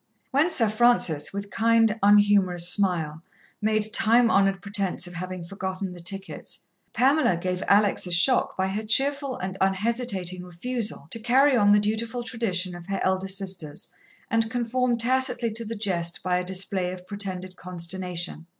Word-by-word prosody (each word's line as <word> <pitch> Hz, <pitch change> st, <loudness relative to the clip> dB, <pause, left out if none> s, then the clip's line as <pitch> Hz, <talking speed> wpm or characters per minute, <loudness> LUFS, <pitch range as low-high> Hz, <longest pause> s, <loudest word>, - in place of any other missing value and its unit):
When 290 Hz, +6 st, +2 dB
Sir 265 Hz, -10 st, +3 dB
Francis, 215 Hz, -9 st, +2 dB
with 200 Hz, 0 st, -7 dB
kind, 225 Hz, 0 st, +2 dB
unhumorous 200 Hz, -4 st, +4 dB
smile, 165 Hz, -6 st, 0 dB, 0.4 s
made 215 Hz, 0 st, +1 dB
time 230 Hz, +1 st, +5 dB
honoured 195 Hz, 0 st, +2 dB
pretence 200 Hz, -1 st, -2 dB
of 175 Hz, -, -10 dB
having 180 Hz, 0 st, -6 dB
forgotten 190 Hz, +1 st, -5 dB
the 175 Hz, -, -11 dB
tickets, 195 Hz, +3 st, -5 dB, 0.3 s
Pamela 255 Hz, -, +2 dB
gave 180 Hz, +1 st, -3 dB
Alex 200 Hz, -2 st, +3 dB
a -, -, -6 dB
shock 180 Hz, +10 st, +3 dB
by 190 Hz, -, 0 dB
her 205 Hz, +3 st, -3 dB
cheerful 270 Hz, +4 st, +1 dB
and 185 Hz, +1 st, -6 dB
unhesitating 195 Hz, -2 st, -1 dB
refusal 220 Hz, +6 st, -4 dB
to 230 Hz, -, -1 dB
carry 260 Hz, +4 st, +3 dB
on 205 Hz, -3 st, +4 dB
the 210 Hz, -, +5 dB
dutiful 225 Hz, +3 st, -2 dB
tradition 195 Hz, -7 st, -2 dB
of 175 Hz, -1 st, -11 dB
her 195 Hz, -1 st, -3 dB
elder 190 Hz, 0 st, 0 dB
sisters 190 Hz, -6 st, -1 dB, 0.4 s
and 225 Hz, 0 st, +1 dB
conform 245 Hz, 0 st, -1 dB
tacitly 250 Hz, 0 st, 0 dB
to 230 Hz, +2 st, -5 dB
the 225 Hz, +1 st, -5 dB
jest 170 Hz, -6 st, -2 dB
by 180 Hz, -1 st, 0 dB
a -, -, -3 dB
display 185 Hz, 0 st, -1 dB
of 180 Hz, 0 st, -10 dB
pretended 185 Hz, -2 st, -5 dB
consternation. 175 Hz, -1 st, -4 dB
200 Hz, 160 wpm, -25 LUFS, 180-230 Hz, 0.4 s, time